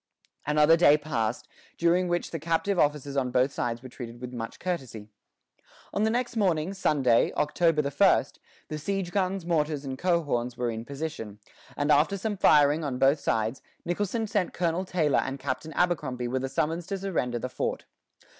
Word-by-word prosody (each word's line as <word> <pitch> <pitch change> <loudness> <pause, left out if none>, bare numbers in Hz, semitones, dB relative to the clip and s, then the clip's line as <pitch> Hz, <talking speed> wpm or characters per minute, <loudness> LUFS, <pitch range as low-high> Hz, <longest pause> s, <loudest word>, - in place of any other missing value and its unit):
Another 150 +2 +5
day 150 -3 +6
passed, 120 -7 -2 0.3
during 175 +2 +2
which 175 0 -1
the 165 - -4
captive 165 +5 0
officers 145 -1 +1
on 130 -2 +1
both 130 +2 +2
sides 120 -2 -3
were 130 - -8
treated 120 -1 -9
with 125 0 -7
much 115 -2 -6
courtesy. 130 - -5 0.8
On 205 - 0
the 220 - +3
next 240 +1 -1
morning, 185 -4 +1
Sunday, 135 -11 +2
October 155 +1 +2
1, 145 +8 +4 0.5
the 155 - -4
siege 195 +2 -2
guns, 190 -1 -1
mortars, 150 -4 0
and 130 -1 -5
coehorns 145 -9 0
were 120 -2 -1
in 115 0 -6
position; 140 -8 -6 0.4
and 145 +1 +1
after 155 +8 +3
some 210 +2 -2
firing 150 -3 +4
on 135 -4 -2
both 135 +3 +4
sides, 110 +3 -1 0.2
Nicholson 205 +6 -1
sent 205 -3 -1
Colonel 175 +1 0
Tailor 160 -6 +1
and 135 +1 -3
Captain 140 +4 -4
Abercrombie 150 -9 0
with 130 +2 -2
a 135 - -2
summons 165 +5 -1
to 195 - -2
surrender 165 -11 -2
the 125 - -3
fort. 125 - -3
150 Hz, 175 wpm, -27 LUFS, 130-175 Hz, 0.8 s, day